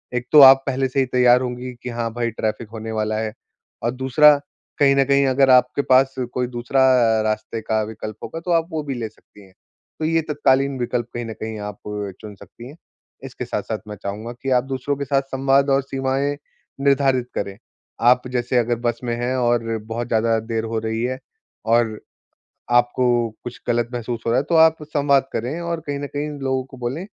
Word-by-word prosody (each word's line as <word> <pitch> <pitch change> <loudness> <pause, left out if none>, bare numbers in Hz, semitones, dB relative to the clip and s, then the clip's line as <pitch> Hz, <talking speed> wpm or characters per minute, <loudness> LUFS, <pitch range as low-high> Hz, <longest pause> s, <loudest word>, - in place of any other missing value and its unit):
एक 125 0 -2
तो 150 - +8
आप 135 0 +9
पहले 135 0 0
से 135 - -1
ही 135 - +3
तैयार 125 0 +4
होंगी 125 0 -5
कि, 125 - -4
हाँ 115 -1 -3
भाई 120 0 -1
ट्रैफ़िक 110 0 -3
होने 110 0 -6
वाला 110 0 -1
है 110 -1 -3 0.5
और 120 - +1
दूसरा 130 +4 +5 0.4
कहीं 140 -1 +5
न 135 0 +3
कहीं 140 +1 +3
अगर 135 0 +3
आपके 125 +2 +4
पास 135 +1 +4 0.2
कोई 125 -1 -1
दूसरा 120 +2 -1 0.4
रास्ते 110 +1 -2
का 110 0 0
विकल्प 110 0 -7
होगा 165 - -6
तो 175 - -3
आप 165 -1 +2
वो 155 -1 -3
भी 140 -2 -4
ले 115 -2 -4
सकती 105 -1 -20
हैं, 95 - -21 0.5
तो 155 - -1
ये 165 +1 +2
तत्कालीन 140 -2 +2
विकल्प 120 -1 -2
कहीं 120 0 -4
न 110 - -6
कहीं 110 0 -6
आप 105 -1 -7 0.4
चुन 105 -1 -9
सकती 120 +4 -13
हैं। 145 - -12 0.5
इसके - - -7
साथ-साथ - - -3
मैं 105 - -6
चाहूँगा 105 +4 -5
कि 135 - -3
आप 125 -1 +3
दूसरों 135 +1 -2
के 140 - -3
साथ 135 0 +1
संवाद 135 +1 +2
और 135 0 +3
सीमाएंँ 135 +1 -1 0.5
निर्धारित 135 -3 +2
करें। 100 0 -4 0.5
आप 125 0 +3
जैसे 125 0 -1
अगर 120 0 +2
बस 120 0 -1
में 120 -1 -2
हैं 125 +2 -1
और 120 -1 +2 0.3
बहुत 115 +2 -4
ज़्यादा 115 0 +2
देर 110 0 -3
हो 115 0 -2
रही 110 +1 -3
है 130 +1 -2 0.5
और 115 -1 +2 0.7
आपको 120 +1 +3 0.4
कुछ 120 -1 -8
गलत 120 0 +1
महसूस 120 -1 -4
हो - - +2
रहा 125 - +3
है, - - -3
तो 170 - -2
आप 160 0 +6
संवाद 140 -2 +1
करें 130 +9 -3
और 170 -1 -3
कहीं 145 -1 -3
न 145 - -4
कहीं 145 +1 -2
लोगों 130 -1 -1
को 130 - -14
बोलें 130 +8 -4
125 Hz, 205 wpm, -21 LUFS, 115-135 Hz, 0.7 s, आप